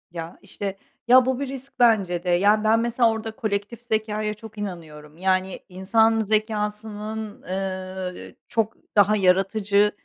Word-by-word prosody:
Ya, 165 0 -7
işte 195 -1 -5 0.3
Ya, 255 +1 +7
bu 260 0 0
bir 280 - -2
risk 270 0 -8
bence 200 -8 +3
de. 180 - -2
Yani, 205 +5 +4
ben 220 +1 +4
mesela 235 0 +2
orada 220 0 -5
kolektif 215 0 -3
zekâya 215 -2 -1
çok 220 0 -13
inanıyorum. 160 -6 -7
Yani, 185 +1 0
insan 220 +5 +2
zekâsının, 215 0 -2
eee, 185 -1 -5
çok 225 -2 0 0.2
daha 205 0 +5
yaratıcı 200 +2 +3
210 Hz, 135 wpm, -24 LUFS, 190-220 Hz, 0.3 s, Ya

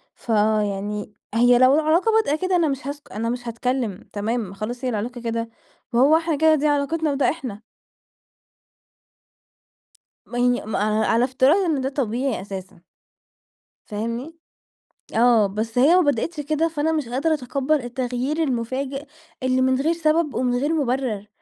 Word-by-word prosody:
فيعني 210 -2 -1 0.2
هي 245 +1 +5
لو 255 +2 +6
العلاقة 320 +8 +2
بادئه 435 -10 +2
كده 370 0 +1
أنا 335 -3 +3
مش 275 -1 -3
هاسك 285 0 -7
أنا 230 +2 -2
مش 245 0 -4
هاتكلّم 235 -3 -3
تمام 210 -1 -2
خلاص 240 +5 -6
هي - - +1
العلاقة 235 +2 -4
كده، 230 0 -3 0.4
ما 235 - +3
هو 300 +5 +6
إحنا 325 -2 -1
كده 315 +1 +4
دي 300 +1 +1
علاقتنا 295 +2 0
وده 275 0 +2
إحنا. 250 -10 -5 2.6
ما 245 - -7
هي 245 -2 +2
ما 215 - -2
ع 215 +1 +1
على 230 +2 +3
افتراض 260 +4 +3
إن 300 -5 0
ده 265 - -1
طبيعي 255 -3 -2
أساسًا. 190 -3 -8 1.0
فاهمني، 230 +9 -4 0.8
آه 230 -2 +5
بس 220 +4 -3
هي 295 +7 +6
ما - - +6
بدأتش 295 +1 0
كده 310 +3 0
فأنا 320 0 -1
مش 300 -7 -2
قادرة 290 +6 +1
أتقبّل 275 +2 -1
التغيير 255 +5 -2
المفاجئ، 265 +2 -2 0.4
اللي 255 0 +1
من 260 0 +2
غير 320 +4 +2
سبب 320 -2 +1
ومن 250 -1 0
غير 290 +5 0
مُبرر، 250 -7 -1
255 Hz, 155 wpm, -22 LUFS, 230-295 Hz, 2.6 s, لو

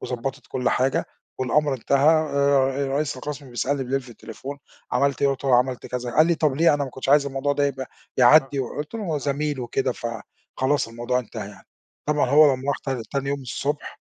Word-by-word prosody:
وضبّطِت 125 +2 -5
كل 125 0 -1
حاجة 130 +1 +1 0.3
والأمر 140 +3 +1
انتهى. 140 +3 +2 0.3
آآ 140 -1 +2
رئيس 145 +2 -1
القسْم 145 -2 -7
بيسألني 135 +3 -1
بليل 135 +2 -1
في 130 - -15
التليفون: 120 +5 -9 0.3
"عملت 140 +2 +1
إيه؟"، 140 - +5
قُلت 135 0 -4
له 130 -3 +5
عملت 125 -1 0
كذا، 125 -1 -4
قال 155 +6 +4
لي: 170 - +3
"طب 155 -4 +1
ليه؟ 165 0 +5
أنا 145 -1 -1
ما 135 - -7
كنتش 130 +2 -7
عايز 145 0 +5
الموضوع 140 +1 -1
ده 145 0 +1
يبقى 135 -1 -4 0.3
يعدّي" 135 +2 +5
وقُلت 145 - -5
له 225 - -3
هو 160 -5 -1
زميل 145 0 -2
وكده 125 +2 -1
فخلاص 125 +3 -3
الموضوع 120 +2 -1
انتهى 110 -4 -6
يعني. 105 - -15 0.4
طبعًا 150 -4 +2
هو 145 -1 +7
لمّا 130 - -7
راح 140 - +1
تان 135 -4 -2
تاني 140 0 -1
يوم 140 0 -1
الصبح، 140 +3 -4
135 Hz, 200 wpm, -24 LUFS, 125-145 Hz, 0.4 s, هو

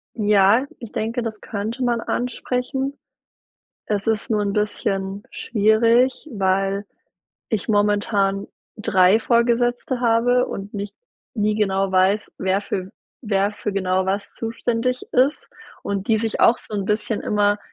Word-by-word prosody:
Ja, 210 +2 +4
ich 230 - -9
denke, 230 +3 -2
das 220 -2 -5
könnte 220 +4 -4
man 240 -2 +1
ansprechen. 250 +3 -2 0.9
Es 205 -1 -2
ist 220 -1 0
nur 210 -2 +2
'n 200 -1 -1
bisschen 200 -1 -2
schwierig, 230 +6 +2
weil 195 0 0 0.6
ich 220 -3 -2
momentan 205 -1 +1 0.3
3 200 -1 +4
Vorgesetzte 240 +2 +1
habe 245 +1 +3
und 200 +2 -7
nicht 200 0 -5 0.4
nie 210 -2 +1
genau 195 -2 +1
weiß, 190 +3 +2
wer 190 +1 +1
für 190 -2 -4 0.3
wer 200 -1 +1
für 210 0 -4
genau 190 -1 0
was 195 +2 -2
zuständig 230 +2 -2
ist 265 +4 +2 0.4
und 200 -1 -3
die 220 -1 +3
sich 225 0 -2
auch 235 - +5
so 215 - -10
'n 200 -2 -1
bisschen 210 +1 -1
immer 205 0 +1
210 Hz, 135 wpm, -22 LUFS, 200-235 Hz, 0.9 s, auch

